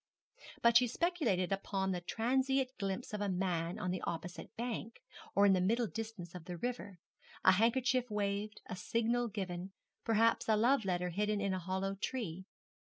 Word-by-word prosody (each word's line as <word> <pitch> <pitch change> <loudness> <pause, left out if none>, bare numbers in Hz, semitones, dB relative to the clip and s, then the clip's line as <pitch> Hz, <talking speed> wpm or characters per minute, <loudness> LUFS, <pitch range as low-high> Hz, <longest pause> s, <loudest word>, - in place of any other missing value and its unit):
But 235 0 +7
she 250 +1 +4
speculated 250 - 0
upon 195 -1 -1
some 180 - -3
transient 265 +3 +1
glimpse 195 +3 -3
of 210 - -2
a 205 - 0
man 180 -1 -1
on 195 -4 -2
the 185 - -2
opposite 175 +2 -5
bank, 230 -1 -4 0.4
or 200 - +6
in 200 - +6
the 185 - +3
middle 230 +6 +2
distance 220 -5 -6
of 180 -3 -8
the 180 -1 -5
river 205 -3 -4 0.5
a 185 - +9
handkerchief 245 +5 +2
waved, 205 0 -2
a - - -5
signal 230 +5 0
given, 190 -3 -5 0.3
perhaps 225 +1 +3
a 220 - +6
love 235 +2 +3
letter 180 -1 0
hidden 210 +3 0
in 200 -1 0
a 185 - -1
hollow 190 +2 -2
tree. 195 -4 -4
205 Hz, 175 wpm, -35 LUFS, 185-235 Hz, 0.5 s, a